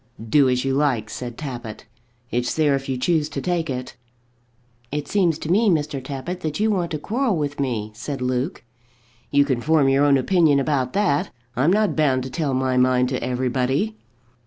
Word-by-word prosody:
"Do 135 +3 +4
as 125 +1 0
you 135 - +1
like," 130 -7 0
said 120 -2 -6
Tappitt. 120 -7 -7 0.5
"It's 125 +1 -1
there 150 -3 +3
if 135 0 -2
you 130 - -1
choose 155 +3 +1
to - - -4
take 170 +1 -1
it." 125 -1 -5 1.0
"It 145 0 -3
seems 175 -6 +2
to 160 - -4
me, 215 +3 +4
Mr. 150 -5 0
Tappitt, 140 +7 -5
that 155 -1 -3
you 215 +1 +2
want 180 -4 0
to 155 - -3
quarrel 225 - -1
with 145 -1 -3
me," 115 -6 -2
said 135 +6 -5
Luke. 125 +5 -2 0.7
"You 140 0 +4
can 130 -4 -1
form 150 -1 +3
your 135 +1 +3
own 140 -1 +5
opinion 155 0 +3
about 135 -3 0
that. 195 -8 +1 0.3
I'm 140 +8 +3
not 210 +1 +2
bound 135 -5 +2
to 130 - -7
tell 145 -3 -1
my 130 0 0
mind 125 0 +3
to 130 -1 -2
everybody." 130 - 0
140 Hz, 190 wpm, -22 LUFS, 130-160 Hz, 1.0 s, own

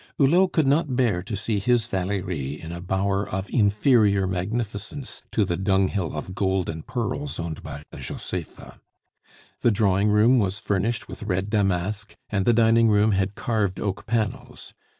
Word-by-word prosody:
Hulot 175 +7 +4
could 160 - +2
not 145 0 +2
bear 115 -9 +2
to 100 +4 -5
see 105 0 -1
his 120 +2 +2
Valerie 90 - -3
in 80 - -8
a 85 0 -6
bower 95 +2 -1
of 95 +1 -3
inferior 105 -2 +3
magnificence 105 +7 -4
to 105 - +2
the 85 -2 -2
dunghill 95 -3 0
of 95 +5 -5
gold 95 -2 0
and 80 -1 -9
pearls 125 +3 -3
owned 85 -2 -4
by 70 - -8
a - - -9
Josepha. - - -7 0.8
The - - +3
drawing 100 -2 +2
room 110 +5 +5
was 100 -2 0
furnished 105 +2 -1
with - - -9
red 100 -1 -2
damask, 100 +1 -1 0.2
and 100 -3 0
the - - +7
dining 115 0 +4
room 105 +1 +4
had 95 0 0
carved 105 -5 -1
oak 100 -2 -3
panels. 110 -3 -3
100 Hz, 165 wpm, -24 LUFS, 95-115 Hz, 0.8 s, the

